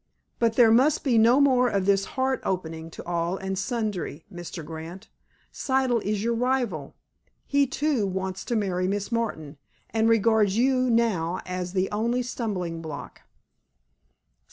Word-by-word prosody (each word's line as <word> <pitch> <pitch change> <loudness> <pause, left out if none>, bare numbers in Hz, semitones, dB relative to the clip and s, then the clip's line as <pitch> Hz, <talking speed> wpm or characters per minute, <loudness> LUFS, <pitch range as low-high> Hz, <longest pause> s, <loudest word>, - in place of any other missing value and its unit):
But 230 -1 +2
there 235 -3 +6
must 265 +6 +4
be 245 -5 +3
no 235 +5 +5
more 255 -3 +4
of 195 -3 0
this 195 0 +3
heart 260 0 +1
opening 165 -3 -3
to - - -10
all 170 +1 -1
and 190 0 -3
sundry, 205 - -3
Mr. 175 -2 -7
Grant. 165 +6 -8 0.4
Siddle 260 -4 +1
is 205 0 -2
your 235 +1 +1
rival. 235 - -1 0.5
He, 280 -1 +2
too, 270 -5 0
wants 190 0 -3
to 240 - -1
marry 185 -4 0
Miss 200 +3 -2
Martin, 160 -11 -3 0.3
and 225 0 +2
regards 220 -2 +3
you 255 +1 +2
now 195 -7 +1
as 180 0 -4
the 190 0 +1
only 235 +4 0
stumbling 185 -9 -3
block." 155 -3 -8
210 Hz, 150 wpm, -26 LUFS, 180-240 Hz, 0.5 s, there